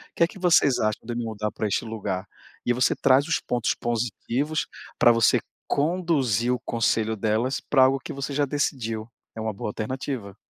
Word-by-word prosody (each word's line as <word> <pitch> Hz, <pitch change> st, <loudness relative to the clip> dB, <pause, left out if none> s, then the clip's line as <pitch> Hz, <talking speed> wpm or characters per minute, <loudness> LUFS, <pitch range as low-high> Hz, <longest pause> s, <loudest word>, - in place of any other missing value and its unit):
que 170 Hz, -, +4 dB
que 185 Hz, -, -13 dB
vocês 160 Hz, -7 st, +4 dB
acham 110 Hz, -1 st, 0 dB
de 120 Hz, -, -4 dB
eu 120 Hz, -, -4 dB
me 120 Hz, -, -2 dB
mudar 105 Hz, -1 st, -3 dB
pra 110 Hz, -, -2 dB
este 100 Hz, -, -1 dB
lugar?". 100 Hz, -4 st, -3 dB, 0.4 s
E 120 Hz, -, +3 dB
você 125 Hz, 0 st, +2 dB
traz 135 Hz, +1 st, +4 dB
os 165 Hz, -, +1 dB
pontos 120 Hz, -2 st, 0 dB
positivos, 120 Hz, +6 st, -2 dB, 0.3 s
pra 120 Hz, -, +7 dB
você 115 Hz, -2 st, +4 dB, 0.3 s
conduzir 140 Hz, -, +1 dB
o 125 Hz, -, 0 dB
conselho 110 Hz, -2 st, 0 dB
delas 110 Hz, +5 st, 0 dB
pra 135 Hz, -3 st, +4 dB
algo 135 Hz, +1 st, +2 dB
que -, -, -6 dB
você 140 Hz, +1 st, -4 dB
já 145 Hz, +1 st, +1 dB
decidiu. 120 Hz, -6 st, -2 dB, 0.3 s
É -, -, -6 dB
uma 110 Hz, -1 st, -2 dB
boa 100 Hz, -, -4 dB
alternativa. 115 Hz, -2 st, -4 dB
120 Hz, 190 wpm, -25 LUFS, 110-140 Hz, 0.4 s, pra